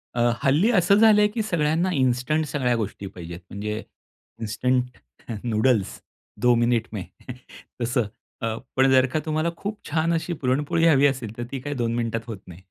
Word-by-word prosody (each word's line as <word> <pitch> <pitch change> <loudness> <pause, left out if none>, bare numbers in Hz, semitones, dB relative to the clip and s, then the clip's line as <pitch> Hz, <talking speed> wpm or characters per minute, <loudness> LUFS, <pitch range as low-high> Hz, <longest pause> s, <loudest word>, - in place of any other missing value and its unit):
अ, 120 - +1 0.2
हल्ली 150 - +4
असं 195 -2 +4
झालंय 210 -2 +6
की 220 +2 -3
सगळ्यांना 170 -2 +1
इन्स्टंट 130 +3 +1
सगळ्या 130 -4 0
गोष्टी 105 -3 -4
पाहिजेत. 85 -2 -8
म्हणजे 105 +2 -4 0.6
इन्स्टंट 125 +3 -1 0.5
नूडल्स 110 -2 +1 0.4
2 125 0 +5
मिनिट 120 -1 +1
में 100 - -4 0.8
तसं. 120 0 +1 0.4
अ, 115 -1 -1 0.2
पण 135 0 +4
जर 130 -1 +6
का 155 - +2
तुम्हाला 155 +1 0
खूप 205 +1 -5
छान 160 +2 +1
अशी 165 +1 -1
पुरणपोळी 145 +3 0
हवी 145 -3 +5
असेल 125 -5 -4
तर, 120 - -3
ती 135 - -3
काही 145 +3 -5
2 115 -2 -1
मिनिटात 115 -1 -1
होत 110 -3 -5
नाही. 90 +1 -12
130 Hz, 165 wpm, -24 LUFS, 115-155 Hz, 0.8 s, झालंय